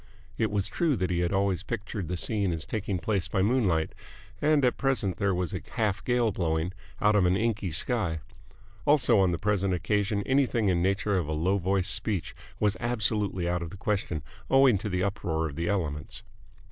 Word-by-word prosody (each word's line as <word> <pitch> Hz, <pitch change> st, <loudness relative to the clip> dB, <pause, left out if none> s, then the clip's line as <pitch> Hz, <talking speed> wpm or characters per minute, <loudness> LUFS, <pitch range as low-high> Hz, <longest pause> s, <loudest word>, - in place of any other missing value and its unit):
It 110 Hz, -, 0 dB
was 100 Hz, -2 st, 0 dB
true 165 Hz, -5 st, +1 dB
that 95 Hz, -4 st, -1 dB
he 85 Hz, -, 0 dB
had 85 Hz, 0 st, 0 dB
always 95 Hz, -2 st, +1 dB
pictured 105 Hz, -5 st, -4 dB
the 90 Hz, +2 st, -3 dB
scene 100 Hz, 0 st, +1 dB
as 80 Hz, -1 st, -3 dB
taking 100 Hz, -3 st, -2 dB
place 100 Hz, +1 st, -1 dB
by 95 Hz, -, 0 dB
moonlight 100 Hz, -9 st, +1 dB, 0.5 s
and 150 Hz, -2 st, +3 dB
at 125 Hz, -, +2 dB
present 120 Hz, -10 st, 0 dB
there 100 Hz, -1 st, +1 dB
was 90 Hz, -2 st, -2 dB
a -, -, -3 dB
half 105 Hz, -4 st, 0 dB
gale 120 Hz, -1 st, +2 dB
blowing, 85 Hz, -1 st, -1 dB, 0.3 s
out 105 Hz, 0 st, +3 dB
of 95 Hz, -3 st, +4 dB
an 90 Hz, +1 st, +2 dB
inky 110 Hz, -3 st, 0 dB
sky; 85 Hz, -, -1 dB, 0.6 s
also 125 Hz, -7 st, +4 dB
on 95 Hz, -2 st, +4 dB
the 85 Hz, -, -1 dB
present 100 Hz, 0 st, +1 dB
occasion 100 Hz, +3 st, 0 dB
anything 130 Hz, -6 st, +2 dB
in 90 Hz, -, +2 dB
the 95 Hz, -, +3 dB
nature 100 Hz, 0 st, 0 dB
of 85 Hz, -, -3 dB
a 80 Hz, -, -2 dB
low 90 Hz, +6 st, +1 dB
voiced 95 Hz, 0 st, +2 dB
speech 100 Hz, -6 st, -1 dB, 0.3 s
was 105 Hz, -1 st, +2 dB
absolutely 105 Hz, -6 st, 0 dB
out 90 Hz, 0 st, 0 dB
of 85 Hz, -, -5 dB
the 100 Hz, -, -10 dB
question 95 Hz, -6 st, -2 dB, 0.3 s
owing 135 Hz, -6 st, +5 dB
to 105 Hz, -, -4 dB
the 90 Hz, -1 st, 0 dB
uproar 80 Hz, -5 st, -1 dB
of 70 Hz, -, -8 dB
the 85 Hz, +2 st, -2 dB
elements. 80 Hz, -8 st, -2 dB
100 Hz, 200 wpm, -28 LUFS, 90-110 Hz, 0.6 s, owing